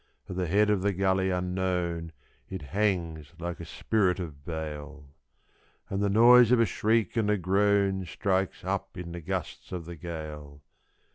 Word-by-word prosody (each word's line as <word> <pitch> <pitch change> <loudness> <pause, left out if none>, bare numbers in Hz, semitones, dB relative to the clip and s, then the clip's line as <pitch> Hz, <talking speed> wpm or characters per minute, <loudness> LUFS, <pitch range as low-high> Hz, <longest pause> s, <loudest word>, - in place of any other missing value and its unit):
At 90 - -6
the 90 -1 -1
head 105 +5 +3
of 100 -3 +1
the 100 +1 +1
gully 95 0 +1
unknown 90 -2 -1 0.4
it 95 -5 -6
hangs 85 -7 -1
like 85 0 -5
a 85 - -7
spirit 95 +2 0
of 75 -6 -7
bale. 75 -2 -6 0.9
And 95 +1 -1
the 100 - +2
noise 120 +3 +7
of 125 - +5
a 115 - +5
shriek 110 +1 +1
and 110 -2 +2
a 105 - +3
groan 95 +1 +2
strikes 95 +1 -1
up - - -3
in 85 -1 -6
the 85 0 -6
gusts 90 0 -5
of 90 -3 -5
the 85 +1 -7
gale. 75 -3 -8
90 Hz, 165 wpm, -28 LUFS, 85-100 Hz, 0.9 s, noise